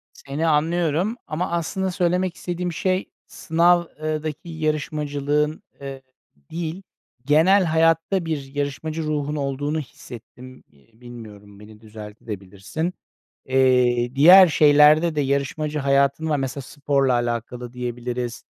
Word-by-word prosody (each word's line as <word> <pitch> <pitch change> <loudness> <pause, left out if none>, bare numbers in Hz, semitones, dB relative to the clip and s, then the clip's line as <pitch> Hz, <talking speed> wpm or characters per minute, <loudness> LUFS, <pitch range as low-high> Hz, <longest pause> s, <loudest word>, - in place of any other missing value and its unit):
Seni 145 +4 -3
anlıyorum 165 +5 +1
ama 160 +4 -3
aslında 185 +3 -2
söylemek 180 0 0
istediğim 180 0 -4
şey 185 +3 -1 0.2
sınav, 175 +1 +2 0.2
ııı, 155 0 -2
daki 155 +2 -6
yarışmacılığın, 150 -1 -2 0.2
eee, 135 -1 -7 0.5
değil 170 +2 -4 0.4
genel 170 +7 +4
hayatta 165 +2 +1
bir 145 -4 -5
yarışmacı 145 +3 -3
ruhun 150 -1 -2
olduğunu 145 +2 -2
hissettim. 130 -2 -12
İii, 110 - -28
bilmiyorum, 105 -4 -12
beni 105 +1 -15
düzeltebilirsin 105 - -7
de. - - -3 0.6
Eee, 125 -2 +2
diğer 180 +7 +9
şeylerde 150 +2 +5
de 150 - 0
yarışmacı 140 +2 -1
hayatın 140 +2 +1
var, 150 - +2
mesela 135 0 -4
sporla 140 -1 0
alakalı 120 0 -3
diyebiliriz, 120 -1 -5
145 Hz, 115 wpm, -22 LUFS, 125-160 Hz, 0.6 s, diğer